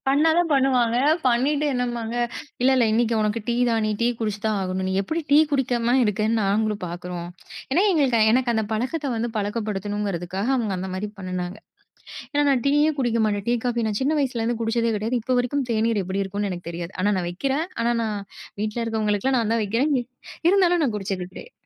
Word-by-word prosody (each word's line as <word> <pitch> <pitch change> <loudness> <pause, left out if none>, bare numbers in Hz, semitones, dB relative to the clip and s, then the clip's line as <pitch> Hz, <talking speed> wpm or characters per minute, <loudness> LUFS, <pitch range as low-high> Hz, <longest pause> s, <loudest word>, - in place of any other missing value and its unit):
பண்ணா 295 +4 +4
தான் 350 -2 +1
பண்ணுவாங்க. 255 -4 +3 0.3
பண்ணிட்டு 280 +5 +2
என்னம்பாங்க, 240 -2 -2 0.5
"இல்ல, 265 - +5
இல்ல 245 - +4
இன்னைக்கு 230 0 +2
உனக்கு 215 +2 0
டீ 235 - +2
தான். 225 -1 +1
நீ 215 - 0
டீ 235 - +3
குடிச்சு 210 -2 -2
தான் 215 -2 +1
ஆகணும்! 185 0 -2
நீ 190 - -1
எப்பிடி 320 +12 -2
டீ 290 - +7
குடிக்காம 245 -3 +1
இருக்கேன்னு 215 +2 +1
நாங்களும் 210 +1 0
பார்க்குறோம்." 175 0 -6 0.4
ஏன்னா, 345 +8 +3
எங்களுக்கு 265 -8 +2
எனக்கு 250 0 +2
அந்த 220 -1 +1
பழக்கத்த 260 +7 -2
வந்து 235 +1 -2
பழக்கப்படுத்தணுங்கிறதுக்காக 205 -2 -2
அவுங்க 215 -5 -1
அந்த 190 0 -4
மாரி 200 +3 -3
பண்ணுனாங்க. 185 +1 -4 0.8
ஏன்னா, 290 0 +2
நான் 255 -4 +1
டீயே 295 +2 +3
குடிக்க 235 -3 +1
மாட்டேன். 205 -1 -2
டீ, 240 - +3
காஃபி 240 -2 0
நான் 210 -1 -2
சின்ன 300 +3 +1
வயசுலேருந்து 235 -3 -1
குடிச்சதே 230 0 +1
கிடையாது. 225 +4 -1
இப்ப 255 +2 0
வரைக்கும் 260 +2 -1
தேநீர் 225 -2 +1
எப்பிடி 190 +2 -2
இருக்குன்னு 200 +1 -3
எனக்கு 175 -1 -7
தெரியாது. 170 +1 -6
ஆனா, 205 +2 +3
நான் 175 -1 -2
வெக்கிறேன். 275 - -1 0.2
ஆனா, 235 +1 +2
நான் 215 -2 -2 0.4
வீட்டுல 215 +2 -2
இருக்கவங்களுக்கெல்லாம் 220 +3 0
நான் 225 0 0
தான் 230 - +1
வெக்கிறேன். 235 +9 +1
எ - - -14 0.5
இருந்தாலும் 355 -3 +3
நான் 235 - -1
குடிச்சது 190 -3 -3
கிடைய 480 - -10
230 Hz, 190 wpm, -23 LUFS, 205-255 Hz, 0.8 s, டீ